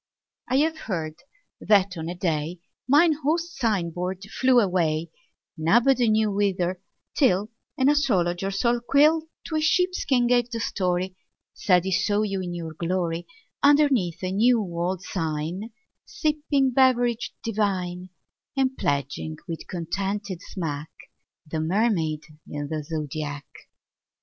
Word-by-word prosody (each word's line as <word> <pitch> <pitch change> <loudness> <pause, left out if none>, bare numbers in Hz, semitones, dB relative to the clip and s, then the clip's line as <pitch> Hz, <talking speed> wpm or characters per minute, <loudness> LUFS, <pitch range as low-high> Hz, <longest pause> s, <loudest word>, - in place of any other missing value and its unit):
I 260 - +2
have 320 +2 +1
heard 160 -5 -2 0.5
that 200 -3 +3
on 165 0 -5
a 175 - -4
day 165 -1 -1 0.3
Mine 310 +5 +5
host's 330 +3 0
sign 205 -9 +1
board 180 +3 -4
flew 260 -1 +4
away, 170 -5 +1 0.4
Nobody 235 +9 +3
knew 215 -1 +2
whither, 185 -3 0 0.3
till 210 - +2 0.3
An 260 -1 +3
astrologer's 195 -8 +1
old 240 0 +1
quill 310 +3 +4 0.2
To 315 - -2
a - - +1
sheepskin 315 -7 +2
gave 245 0 +2
the 230 -1 -4
story, 185 -2 -1 0.4
Said 180 -3 +3
he 190 - -2
saw 205 +3 +2
you 195 -2 -2
in 175 -1 -4
your 165 -2 -5
glory, 170 0 -2 0.3
Underneath 280 - +3
a 185 - -1
new 230 +5 +4
old 180 -1 -2
sign 165 +4 -3 0.3
Sipping 295 -3 0
beverage 245 -2 +2
divine, 185 -5 -1 0.5
20 - - -29
And 265 - -25
pledging 135 - -1
with 165 -1 -6
contented 190 +2 -3
smack 155 -6 -5 0.6
The 155 +1 -4
Mermaid 165 -3 +1 0.3
in 145 -1 -5
the 155 -1 -3
Zodiac. 150 -1 -4
190 Hz, 130 wpm, -25 LUFS, 170-245 Hz, 0.6 s, Mine